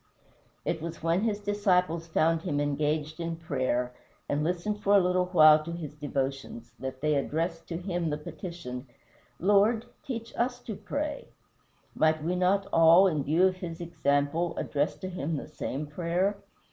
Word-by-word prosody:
It 165 -2 -1
was 165 0 -6
when 165 +3 +2
his 215 -2 0
disciples 180 -5 +1
found 165 0 +2
him 155 -5 -1
engaged 150 +2 -1
in 165 0 -2
prayer, 130 -6 -1 0.3
and 145 +1 0
listened 180 +5 -1
for 205 0 +4
a - - +8
little 180 0 +2
while 155 -4 +7
to 170 - -6
his 165 -4 -6
devotions, 135 -5 -4
that 130 0 -6
they 150 0 +2
addressed 165 +4 -1
to 165 - -4
him 175 -2 -2
the 150 - -1
petition, 150 -5 -7 0.5
"Lord, 205 +4 +3 0.2
teach 230 -3 -6
us 245 +1 0
to 220 - -6
pray." 295 +5 -4 0.7
Might 155 -1 +2
we 175 +3 0
not 190 +2 +2
all, 165 +3 +7
in 155 -7 +1
view 160 +7 +3
of 185 -1 +1
his 170 -3 -6
example, 165 0 0
address 145 +1 -1
to 185 - -7
him 165 -4 -3
the - - -6
same 150 -1 -4
prayer? 175 +6 0
165 Hz, 165 wpm, -28 LUFS, 150-185 Hz, 0.7 s, a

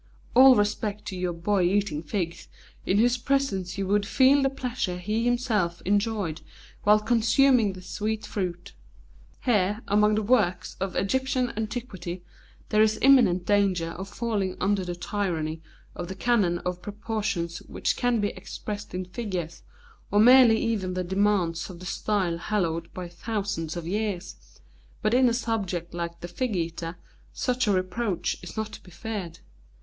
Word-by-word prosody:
All 260 +1 +8
respect 210 0 -1
to 190 - -6
your 180 -1 -1
Boy 185 +4 0
Eating 180 -4 +1
Figs, 170 +1 -4 0.4
in 190 - +3
whose 240 +3 +4
presence 235 -9 0
you 195 - -1
would 205 +2 +2
feel 270 +4 +5
the 270 - +3
pleasure 250 -9 -3
he 210 +5 -1
himself 225 -8 +1
enjoyed 200 -4 0 0.4
while 210 +1 +6
consuming 235 0 +3
the 185 0 -11
sweet 215 +3 -3
fruit. 180 -2 -4 0.7
Here, 210 -3 +1
among 210 +1 +3
the 215 - 0
works 205 -6 +1
of 190 0 -3
Egyptian 255 +3 0
antiquity, 210 -6 -5 0.5
there 215 - +4
is 215 0 +3
imminent 225 -10 +5
danger 195 -5 +2
of 190 +3 -7
falling 205 -6 -2
under 195 0 +1
the 175 -1 -4
tyranny 165 -5 -2 0.3
of 175 - -6
the 190 - -6
canon 200 -5 +2
of 180 0 -3
proportions 205 -5 -3
which - - -2
can 245 -2 +1
be 205 0 +1
expressed 205 -3 -7
in 185 0 -3
figures, 180 -5 -5 0.5
or 205 - +3
merely 245 0 +8
even 205 -6 -1
the 185 - -1
demands 190 -3 +1
of 175 -2 -9
the 185 - -9
style 190 -3 -1
hallowed 170 -4 -1
by 180 -1 -5
thousands 195 -3 -3
of 170 - -5
years, 200 0 -2 0.7
but 215 0 +2
in 255 0 +5
a - - 0
subject 195 -8 -2
like 170 0 -5
the 175 - -5
'Fig 225 +5 -2
eater' 165 0 -3 0.4
such 250 -2 0
a - - +4
reproach 185 +1 -1
is 180 - -10
not 220 0 -2
to - - -10
be - - -16
feared. 190 -2 -6
205 Hz, 160 wpm, -26 LUFS, 180-225 Hz, 0.7 s, All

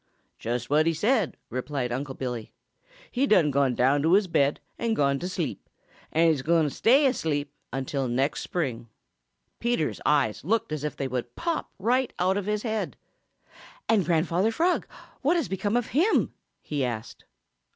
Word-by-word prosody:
"Just 120 +1 -2
what 155 +3 +3
he 165 - +2
said," 215 - +1
replied 130 0 -2
Unc' 135 +2 -4
Billy. 125 -4 -4 0.6
"He 265 +3 +1
done 170 - +4
gone 135 -2 +2
down 135 +4 +3
to 160 +4 +3
his 200 +1 +5
bed 145 -5 +2 0.2
and 230 -1 0
gone 140 -4 +2
to 180 - -3
sleep, 175 -3 -4 0.4
and 165 +1 +4
he's 145 -4 -1
gwine 165 +3 +3
to 150 - +1
stay 270 - +4
asleep 150 - 0 0.2
until 135 0 -2
next 135 +4 0
spring." 120 -9 -3 0.7
Peter's 235 -10 0
eyes 140 -8 +2
looked 215 +2 0
as 155 -2 -3
if 150 - -3
they 135 - -2
would 125 -2 -4
pop 335 -2 -2
right 250 +5 +1
out 185 +2 +2
of 205 -1 -2
his 210 0 -1
head. 220 -2 -2 0.9
"And 215 -4 +4
Grandfather 175 +5 +1
Frog, 340 +9 +1 0.3
what 300 +6 +3
has 330 -7 0
become 200 +4 0
of 245 - -1
him?" 345 - +2 0.3
he 145 -3 -2
asked. 115 -3 -5
160 Hz, 170 wpm, -27 LUFS, 135-215 Hz, 0.9 s, his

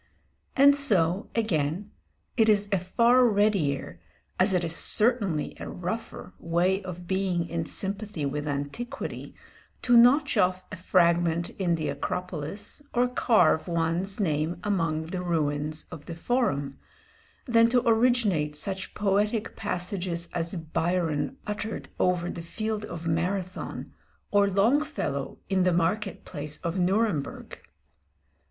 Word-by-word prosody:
And 280 +1 +7
so, 195 -8 +1
again, 185 -3 -1 0.4
it 225 -2 +4
is 205 -1 +4
a 195 - +3
far 235 +8 +4
readier, 195 - +1 0.4
as - - +4
it 180 -2 +1
is 165 -1 -1
certainly 210 -10 +1
a - - -6
rougher, 190 +2 -5
way 175 +3 +1
of 180 -2 -8
being 185 -2 0
in 165 -1 -3
sympathy 200 -5 -4
with 145 +2 -3
antiquity, 145 - -5 0.5
to 245 -1 +4
notch 260 +5 +5
off 185 0 +2
a - - -4
fragment 170 -2 +2
in 175 -3 0
the 160 -2 -3
Acropolis, 180 - -4
or 245 +1 +3
carve 215 -10 +3
one's 170 +4 -1
name 160 -2 0
among 165 -6 0
the 180 +2 -4
ruins 155 -3 -1
of 160 -4 -10
the 170 - -5
Forum, 165 - -1 0.7
than 230 -2 +4
to 245 0 +2
originate 220 -10 +2
such 190 +4 -4
poetic 210 +2 0
passages 175 -1 -3
as 170 +1 -1
Byron 165 - -1
uttered 210 +1 -4
over 180 -1 +1
the 170 - -6
field 215 +5 -3
of 170 -3 -7
Marathon, 180 +3 -3 0.4
or 200 -1 +4
Longfellow 210 - 0
in 190 -1 +1
the 180 0 +3
market 180 +5 -1
place 150 -2 -4
of 170 +2 -2
Nuremburg. 185 -5 -1
185 Hz, 130 wpm, -27 LUFS, 165-210 Hz, 0.7 s, And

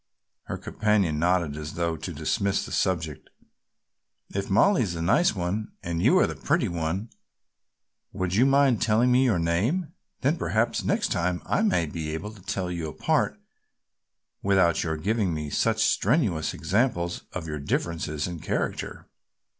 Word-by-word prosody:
Her - - -4
companion 100 -8 0
nodded 85 -3 +1
as 75 +1 -6
though 85 -1 0
to 80 - -6
dismiss 100 0 -1
the - - -9
subject. 80 -6 -1 1.0
"If 100 0 -3
Mollie 170 - +4
is 95 -7 -1
the 85 - -4
nice 140 - +3
one 95 +4 -3
and 85 -1 -2
the - - +3
pretty - - +2
one, 85 +6 -3 1.0
would 95 -2 -2
you 120 +7 +4
mind 135 -4 +4
telling 115 +3 +3
me 125 +1 +5
your 115 -7 +3
name, 105 - 0 0.3
then - - +2
perhaps - - 0
next - - 0
time 90 0 0
I - - +1
may 205 - +2
be 80 0 -4
able 105 +6 -5
to 105 -3 -15
tell 90 -1 -3
you 85 -2 -3
apart - - 0 1.0
without 95 -4 +3
your 80 -2 -2
giving 100 +1 0
me 75 -1 -4
such - - +2
strenuous 105 - +1
examples 95 -6 0
of 90 -3 -4
your 75 -2 -4
differences 75 +1 -2
in 85 -2 -5
character." - - -3
90 Hz, 155 wpm, -26 LUFS, 85-105 Hz, 1.0 s, me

